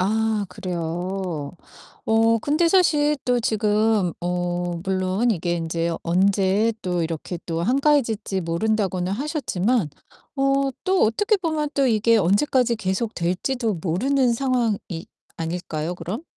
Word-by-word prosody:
아 215 +2 +1
그래요. 175 -2 -4 0.5
어 225 +1 +3
근데 305 +8 +2
사실 300 -5 +3
또 245 -1 +2
지금 215 -3 +1
어 175 0 -2
물론 190 +4 0
이게 175 -2 -1
인제 165 0 -2
"언제 195 +4 +2
또 180 -2 -1
이렇게 165 +2 -4
또 165 -1 -2
한가해질지 235 - +1
모른다."고는 185 +1 -1
하셨지만 240 - -1 0.5
어 275 0 +2
또 375 0 +2
어떻게 415 - +2
보면 315 -5 -1
또 275 -1 +3
이게 230 -1 +3
언제까지 235 - +2
계속될지도 210 +3 -1
모르는 250 +9 +1
상황이 240 -4 0 0.6
아닐까요, 165 0 -3
그럼? 190 - -5
210 Hz, 260 characters per minute, -23 LUFS, 180-250 Hz, 0.6 s, 어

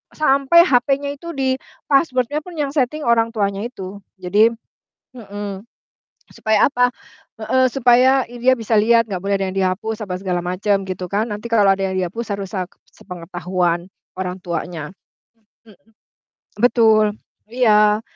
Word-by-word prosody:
sampai 300 +3 +4
HP-nya 280 +2 +1
itu 335 +4 -10
di 260 -1 +1 0.4
password-nya 275 -1 +1
pun 355 -2 -10
yang 285 -2 -1
setting 295 +2 -1
orang 230 -1 +3
tuanya 200 -1 -1
itu. 200 -5 -8 0.2
Jadi 210 +5 +4 0.7
mhm, 205 -2 -7 0.7
supaya 220 -1 +2
apa? 245 -1 +2 0.5
Heeh, 260 +4 +2
supaya 255 +1 +4
i 245 - -10
dia 260 +1 +5
bisa 225 0 -3
lihat, 230 +1 +4
nggak 185 -2 -3
boleh 200 0 0
ada 195 - -1
yang 190 - -7
dihapus 195 +4 -1
apa 180 - -4
segala 180 -2 -2
macam, 195 +2 0
gitu 185 -1 -4
kan. 215 +3 0
Nanti 210 +2 -6
kalau 205 -4 +4
ada 195 - -3
yang 185 - -3
dihapus 205 +4 -3
harus 195 -1 -7
sak 185 -2 -4 0.2
sepengetahuan 175 -1 -3 0.3
orang 180 0 -3
tuanya. 170 -2 -5 0.8
Mhm. 195 0 -21 0.7
Betul, 220 -3 +4 0.3
iya. 210 -3 +3
215 Hz, 145 wpm, -19 LUFS, 190-250 Hz, 0.8 s, dia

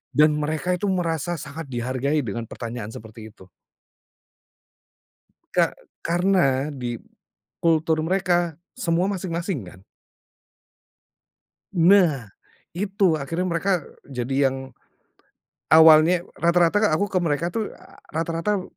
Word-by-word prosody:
dan 150 +1 +6
mereka 155 +4 -2
itu 205 - -1
merasa 175 -2 -1
sangat 140 +1 -8
dihargai 130 +4 -1
dengan 115 0 -5
pertanyaan 115 -2 -6
seperti 110 0 -11
itu. 95 0 -17 2.0
Ka - - +2 0.3
karena 170 -6 +1
di 120 -3 -4 0.6
kultur 160 -1 +2
mereka, 175 -2 +1 0.2
semua 175 -5 0
masing-masing 175 - -3
kan? 95 +1 -14 1.9
Nah 170 - +4 0.5
itu 195 -2 +1
akhirnya 165 +6 -3
mereka 175 +1 0 0.2
jadi 135 +1 0
yang 130 -1 -8 0.9
awalnya 160 +2 +7 0.2
rata-rata 175 +5 +3
aku 205 +4 0
ke 185 - +1
mereka 165 +1 0
tuh, 220 +2 -4 0.4
rata-rata 165 +5 -1
165 Hz, 100 wpm, -23 LUFS, 135-180 Hz, 2.0 s, awalnya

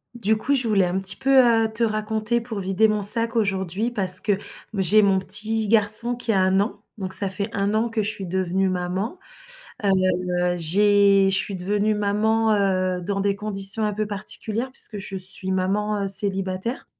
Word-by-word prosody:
Du 220 -1 0
coup, 280 +6 -1
je 245 -3 -1
voulais 200 -4 +2
un 180 +2 -2
petit 190 0 0
peu, 265 +6 -4 0.4
heu, 220 - -4
te 230 +2 -1
raconter 220 +1 -2
pour 225 -3 -7
vider 195 +3 +1
mon 210 -1 -2
sac 230 +3 +6
aujourd'hui, 195 +1 -2
parce 185 -5 +6
que, 210 - -2
m 195 - -1 0.4
j'ai 195 +3 +3
mon 195 -1 +2
petit 220 +3 -2
garçon 220 +3 +4
qui 240 -1 -4
a 195 - +1
1 190 +1 +1
an. 205 0 -4
Donc 190 -2 -4
ça 195 0 +4
fait 200 +3 -4
1 200 +1 -2
an 225 +2 0
que 225 -1 -2
je 205 - -2
suis 200 -3 -6
devenue 190 +1 -2
maman. 185 - -4 0.6
Heu, 200 - +1 0.7
j'ai 200 +3 +2
je 195 - +1
suis 195 0 0
devenue 205 +4 -1
maman, 215 +2 0
heu, 185 -2 -1
dans 195 +3 -4
des 200 0 -1
conditions 200 0 -2
un 210 - -2
peu 215 +1 -4
particulières 215 +4 -4
puisque 215 - 0
je 195 0 -8
suis 190 0 -3
maman, 200 +3 -2
heu, - - -2
célibataire 195 +3 -1
205 Hz, 195 wpm, -22 LUFS, 190-220 Hz, 0.7 s, sac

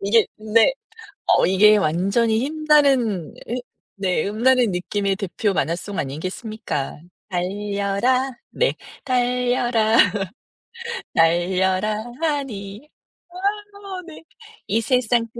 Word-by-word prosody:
이게 210 +3 +3
근데 220 - +4 0.5
어 - - +4
이게 210 +3 +6
완전히 200 +6 +1
힘나는 275 - +2
음 240 - -2 0.4
네 185 -4 0
힘나는 240 +2 +3
느낌의 195 +2 -1
대표 200 +1 -2
만화송 175 +6 -2
아니겠습니까. 160 - -4 0.3
달려라 200 +7 0 0.2
네 - - +1 0.3
달려라, 245 -3 +1 1.2
달려라 185 +5 +2 0.3
하니. 270 -6 -3 0.4
아 350 - -21 0.7
네. 325 -1 -12 0.4
이 220 +3 +1
세상 240 0 +1
215 Hz, 190 characters per minute, -22 LUFS, 190-250 Hz, 1.2 s, 이게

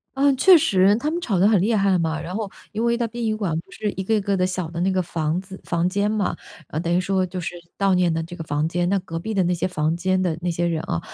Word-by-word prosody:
嗯， 275 0 +3
确 365 +7 +7
实， 195 -8 +4
她 290 +7 -1
们 345 +2 -2
吵 210 - 0
得 190 +3 +5
很 210 -4 +4
厉 220 +4 +2
害 195 -2 +3
嘛， 160 -1 -1
然 180 +3 -6
后， 215 -2 -3 0.2
因 220 +2 -2
为 235 0 +2
在 235 -1 0
殡 235 +1 -6
仪 220 -1 0
馆 195 -7 -2
不 - - -14
是 210 -1 -3
一 190 - -5
个 220 +4 +1
一 210 - +1
个 200 0 0
的 185 -1 +1
小 185 -2 -3
的 170 - -5
那 190 +2 +2
个 185 - +1
房 160 0 -1
子 190 0 -11
房 170 0 0
间 200 +2 0
嘛， 215 -2 0 0.5
等 170 0 -2
于 - - +3
说 190 0 +1
就 185 0 -4
是 175 - -4 0.2
悼 195 -1 +2
念 180 -2 +3
的 165 0 -1
这 170 +2 -9
个 165 - -6
房 150 +1 0
间。 175 +1 0
那 200 - +2
隔 165 -3 -6
壁 220 +6 -4
的 190 - +3
那 180 +1 +1
些 175 +1 -1
房 155 -3 -1
间 185 +2 0
的 180 -3 0
那 175 - -1
些 175 0 -1
人 165 -2 0
啊， 85 - -2
185 Hz, 325 characters per minute, -23 LUFS, 170-210 Hz, 0.5 s, 确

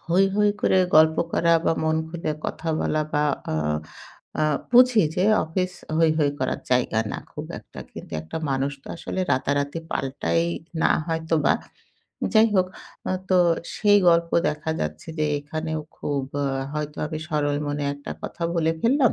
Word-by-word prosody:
হৈ, 185 +3 +4
হৈ 210 0 +4
করে 190 - +3 0.2
গল্প 160 0 +6 0.2
করা 170 0 +3
বা - - +3
মন 160 0 +2
খুলে 165 -2 -3
কথা 165 - -4
বলা 155 0 +1
বা 150 - +2 0.3
আ - - -1 0.9
আ - - +3 0.3
বুঝি 250 -3 +7
যে 180 - +2 0.2
অফিস 180 +3 -2 0.3
হৈ, 165 -1 +5
হৈ 145 -2 +3
করার 130 - -1
জায়গা 125 -3 +2
না - - -3
খুব - - -6
একটা। - - -14
কিন্তু - - -10
একটা 80 - -7
মানুষ 135 +1 0
তো - - -28
আসলে 185 - -4
রাতারাতি 140 +4 0
পাল্টায় 140 +5 0 0.4
না - - +4 0.2
হয়তোবা। 160 -1 +1 0.8
যাই 220 0 +6
হোক 185 -1 +4 0.4
আ - - 0 0.2
তো 185 - +4 0.4
সেই 205 -1 +5
গল্প 170 0 +3 0.2
দেখা 150 +1 -3
যাচ্ছে 75 - -4
যে, 155 - +2 0.2
এখানেও 155 +2 -4 0.2
খুব 140 -2 -2 0.2
আ - - 0 0.3
হয়তো 150 0 -4
আমি 155 0 -4
সরল 145 -2 0
মনে 145 0 -2
একটা 145 0 -9
কথা 170 - -6
বলে 165 -1 +2
ফেললাম। 255 0 +4
160 Hz, 165 wpm, -24 LUFS, 145-175 Hz, 0.9 s, বুঝি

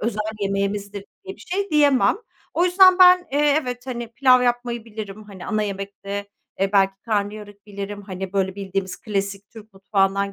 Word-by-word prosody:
özel 215 -1 -2 0.2
yemeğimizdir 200 0 -2 0.2
diye 385 0 -8
bir - - -20
şey 395 +3 -3
diyemem. 290 -2 +4 0.4
O 345 - +3
yüzden 370 +1 +6
ben, 365 0 +8
eee, 290 0 +3
evet, 250 +1 -6
hani, 240 -2 -5
pilav 255 -1 +4
yapmayı 240 -1 -1
bilirim, 215 -2 -8
hani, 195 -3 -11
ana 215 0 0
yemekte, 200 0 -5 0.3
eee, 195 +1 +1
belki 195 -1 +4
karnıyarık 205 -1 -4
bilirim. 200 0 -7
Hani, 190 -1 -6
böyle 190 -1 0
bildiğimiz 195 -1 -4
klasik 200 -1 -4
Türk 220 -1 -14
mutfağından 195 0 0
205 Hz, 165 wpm, -22 LUFS, 195-245 Hz, 0.4 s, ben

